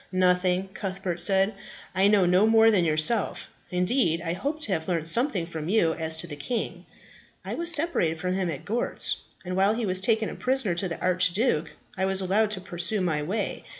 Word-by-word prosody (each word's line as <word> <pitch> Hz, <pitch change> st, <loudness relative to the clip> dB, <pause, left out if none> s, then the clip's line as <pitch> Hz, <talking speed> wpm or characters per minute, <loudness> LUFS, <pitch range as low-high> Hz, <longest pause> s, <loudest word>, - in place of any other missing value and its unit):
"Nothing," 185 Hz, 0 st, +1 dB
Cuthbert 190 Hz, -3 st, -4 dB
said. 195 Hz, +3 st, +2 dB, 0.4 s
"I 190 Hz, +1 st, +3 dB
know 205 Hz, -3 st, +3 dB
no 180 Hz, +4 st, +3 dB
more 225 Hz, 0 st, +5 dB
than 185 Hz, -5 st, +2 dB
yourself. 160 Hz, +8 st, +1 dB, 0.2 s
Indeed, 180 Hz, -1 st, +1 dB
I 170 Hz, -1 st, -3 dB
hoped 290 Hz, -, -4 dB
to 215 Hz, -, -2 dB
have 160 Hz, -4 st, -2 dB
learnt 165 Hz, -3 st, -2 dB
something 225 Hz, -, +3 dB
from 160 Hz, -1 st, -7 dB
you 180 Hz, -6 st, +2 dB
as 160 Hz, -1 st, 0 dB
to 160 Hz, -, -3 dB
the 155 Hz, -4 st, -8 dB
king." 235 Hz, -, -4 dB, 0.6 s
"I -, -, -4 dB
was 340 Hz, +1 st, +2 dB
separated 300 Hz, -, +2 dB
from 180 Hz, +2 st, -2 dB
him 185 Hz, -2 st, -2 dB
at 145 Hz, -5 st, -7 dB
Gortz, 230 Hz, +4 st, +1 dB, 0.3 s
and 180 Hz, 0 st, -4 dB
while 195 Hz, +3 st, +2 dB
he 230 Hz, -1 st, -2 dB
was 185 Hz, -1 st, +2 dB
taken 220 Hz, +1 st, +1 dB
a -, -, -6 dB
prisoner 255 Hz, -7 st, -1 dB
to 175 Hz, +3 st, -2 dB
the 170 Hz, -, -6 dB
archduke, 185 Hz, -1 st, 0 dB, 0.3 s
I 190 Hz, -1 st, -1 dB
was 190 Hz, 0 st, +2 dB
allowed 200 Hz, +3 st, +1 dB
to 200 Hz, -3 st, -3 dB
pursue 180 Hz, +3 st, 0 dB
my 160 Hz, -5 st, -1 dB
way. 185 Hz, +9 st, -3 dB
185 Hz, 200 wpm, -25 LUFS, 170-215 Hz, 0.6 s, more